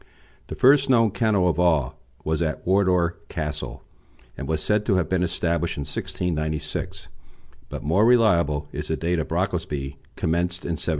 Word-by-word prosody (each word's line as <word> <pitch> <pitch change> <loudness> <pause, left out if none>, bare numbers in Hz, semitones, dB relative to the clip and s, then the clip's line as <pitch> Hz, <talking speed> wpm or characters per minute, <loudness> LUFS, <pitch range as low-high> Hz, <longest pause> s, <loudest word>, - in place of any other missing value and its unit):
The - - -6
first 135 +1 +5
known 115 -4 +4
kennel 105 -4 +2
of 90 - 0
all 75 -5 +2 0.2
was 80 +1 -1
at 80 -2 -2
Wardour 90 -2 +2
Castle, 75 0 -5 0.5
and 70 - -6
was 80 -1 -1
said 105 0 +2
to 95 - +3
have 90 -3 +1
been 95 -1 0
established 85 -1 -1
in - - -3
1696; 85 +2 -3 0.6
but - - -6
more 85 +8 +3
reliable 85 - +3
is 75 +1 -5
the 80 - -1
date 85 +1 0
of 80 - -2
the - - -4
Brocklesby, 70 -1 -2 0.2
commenced 90 +2 -1
in - - -2
1713. 80 - -2
85 Hz, 170 wpm, -24 LUFS, 75-95 Hz, 0.6 s, first